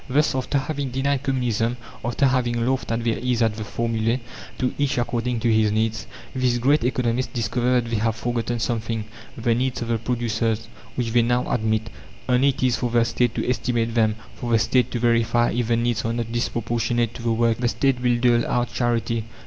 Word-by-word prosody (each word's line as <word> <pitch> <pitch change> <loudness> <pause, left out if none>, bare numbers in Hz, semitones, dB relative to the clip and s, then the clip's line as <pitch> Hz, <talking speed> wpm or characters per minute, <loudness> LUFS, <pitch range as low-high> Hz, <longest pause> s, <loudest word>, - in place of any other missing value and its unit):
Thus, 150 +4 +2
after 130 +2 0
having 140 0 -2
denied 135 +1 0
Communism, 125 -4 0 0.3
after 120 +4 +1
having 120 -3 +1
laughed 130 -1 -1
at 115 0 -1
their 115 -1 0
ease 125 -1 +1
at 110 -2 +1
the 110 - -5
formula 115 +1 0 0.4
"To 125 -1 0
each 140 -3 +1
according 120 0 -1
to 115 -2 +3
his 110 -1 +3
needs" 110 +1 -1 0.3
these 125 -2 +2
great 135 +3 +3
economists 125 0 0
discover 120 +2 0
that 120 - -3
they 115 - +1
have 110 +1 0
forgotten 120 0 -2
something, 115 -2 -2 0.3
the 115 0 +1
needs 125 +1 -1
of 115 - -6
the 115 -1 +1
producers, 115 -2 -1 0.3
which 120 -2 -1
they 120 +1 +4
now 120 +1 +1
admit. 110 -1 0 0.4
Only 130 +2 +4
it 135 - -2
is 125 -2 +3
for 120 - -1
the 115 0 +3
State 120 0 0
to - - -2
estimate 120 -2 0
them, 110 -2 +2 0.2
for 120 - -4
the 115 - +5
State 120 +2 +2
to - - -3
verify 120 0 +2
if 120 -1 -1
the 115 0 +2
needs 120 -1 0
are 115 - -1
not 115 -1 -3
disproportionate 120 0 -1
to - - -9
the 115 0 0
work. 115 0 +2
The 120 - +1
State 130 +1 +1
will 120 -1 +2
dole 120 -1 +3
out 120 0 0
charity. 115 -2 0
120 Hz, 205 wpm, -23 LUFS, 115-125 Hz, 0.4 s, the